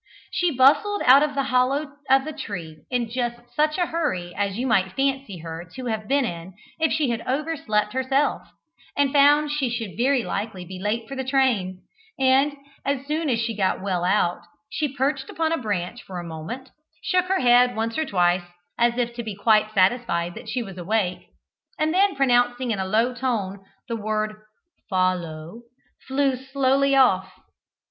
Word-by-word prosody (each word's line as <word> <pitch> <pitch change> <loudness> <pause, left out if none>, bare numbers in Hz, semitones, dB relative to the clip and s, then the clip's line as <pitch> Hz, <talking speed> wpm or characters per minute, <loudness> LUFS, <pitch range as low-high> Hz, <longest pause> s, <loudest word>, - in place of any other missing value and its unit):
She 355 - +1
bustled 310 - +3
out 265 +3 +8
of 295 -1 0
the 275 - +1
hollow 275 +4 +2 0.2
of 270 +1 +4
the 310 - -5
tree 175 - -7
in 245 -2 0
just 240 -1 -2 0.2
such 305 +2 +2
a 355 - +2
hurry 290 - -2
as 200 0 -2
you 250 - -1
might 190 -6 +2
fancy 270 -7 -1
her 165 +1 -7
to 255 - -6
have 220 -3 -3
been 275 0 +2
in 175 -2 -6 0.2
if 320 0 +2
she 295 -6 +1
had 230 -1 -2
overslept 260 -7 -1
herself 265 +2 +1 0.6
and 280 -1 +2
found 290 +1 +5
she 290 -4 0
should 230 -4 -4
very 255 +2 +2
likely 200 -5 -4
be 185 +1 -8
late 220 +3 -2
for 275 - -6
the 265 - -3
train, 245 -9 0 0.3
and, 270 +2 +3 0.3
as 275 -1 -1
soon 305 +1 -1
as 235 -3 +1
she 225 -1 -2
got 195 -2 0
well 185 -3 -1
out, 180 -1 +1 0.3
she 300 -3 -1
perched 270 +1 -1
upon 320 -1 -1
a 330 - +1
branch 205 +1 -3
for 185 - -8
a - - -6
moment, 170 +11 -7 0.3
shook 365 0 +2
her 380 +1 +1
head 245 0 +5
once 225 +1 -2
or 315 - +1
twice 180 - +2 0.4
as 235 0 +3
if 240 -1 -1
to 235 - -5
be 220 -3 -6
quite 215 +1 +3
satisfied 185 -4 +1
that - - -9
she 250 - -2
was 195 -4 -9
awake, 185 0 -1 0.5
and 310 +1 +1
then 390 +1 +3
pronouncing 245 -2 +2
in 205 - -1
a 190 - -1
low 225 +5 +2
tone 215 -6 -2 0.2
the 230 - -2
word 215 0 -2 0.5
"Follow," 180 0 -1 0.5
flew 270 0 +1
slowly 270 +1 +1
off. 220 -9 +4
245 Hz, 180 wpm, -24 LUFS, 200-275 Hz, 0.6 s, out